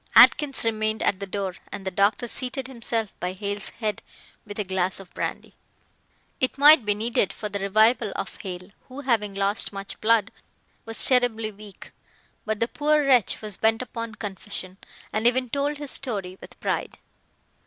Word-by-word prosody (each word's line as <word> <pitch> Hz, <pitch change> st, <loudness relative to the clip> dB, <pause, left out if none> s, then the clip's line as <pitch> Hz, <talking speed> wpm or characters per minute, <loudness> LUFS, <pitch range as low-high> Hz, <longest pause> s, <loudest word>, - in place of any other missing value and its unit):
Atkins 280 Hz, -5 st, +6 dB
remained 215 Hz, -1 st, 0 dB
at 190 Hz, -, +1 dB
the 200 Hz, -, -5 dB
door, 190 Hz, -1 st, -3 dB
and 195 Hz, -, -7 dB
the 190 Hz, -, -2 dB
doctor 200 Hz, +6 st, +1 dB
seated 255 Hz, +2 st, -3 dB
himself 230 Hz, -4 st, -3 dB
by 180 Hz, +1 st, -3 dB
Hale's 200 Hz, +1 st, -3 dB
head 215 Hz, -2 st, -3 dB, 0.5 s
with 205 Hz, -, -8 dB
a 210 Hz, -, 0 dB
glass 190 Hz, 0 st, 0 dB
of 190 Hz, -2 st, -13 dB
brandy. -, -, -4 dB, 0.9 s
It 255 Hz, -, 0 dB
might 290 Hz, -3 st, +8 dB
be 205 Hz, -1 st, +2 dB
needed 220 Hz, -2 st, 0 dB
for 210 Hz, -, -5 dB
the 200 Hz, 0 st, -4 dB
revival 215 Hz, +2 st, +3 dB
of -, -, -5 dB
Hale, 185 Hz, 0 st, -7 dB, 0.2 s
who, 265 Hz, +2 st, -8 dB
having 220 Hz, -7 st, 0 dB
lost 200 Hz, +2 st, +1 dB
much 195 Hz, -1 st, -6 dB
blood, 225 Hz, -1 st, +3 dB, 0.5 s
was 225 Hz, -1 st, +5 dB
terribly 240 Hz, -4 st, +3 dB
weak. 205 Hz, -1 st, -13 dB, 0.6 s
But 215 Hz, -1 st, -1 dB
the 230 Hz, -, +1 dB
poor 300 Hz, +2 st, +1 dB
wretch 250 Hz, -6 st, +3 dB
was 210 Hz, -3 st, 0 dB
bent 225 Hz, +2 st, +2 dB
upon 230 Hz, -3 st, -6 dB
confession, 195 Hz, -2 st, -6 dB, 0.3 s
and 220 Hz, +2 st, +2 dB
even 250 Hz, 0 st, +1 dB
told 285 Hz, +1 st, -1 dB
his 290 Hz, -1 st, -6 dB
story 200 Hz, -9 st, -3 dB
with -, -, -13 dB
pride. -, -, -2 dB
215 Hz, 170 wpm, -25 LUFS, 200-245 Hz, 0.9 s, might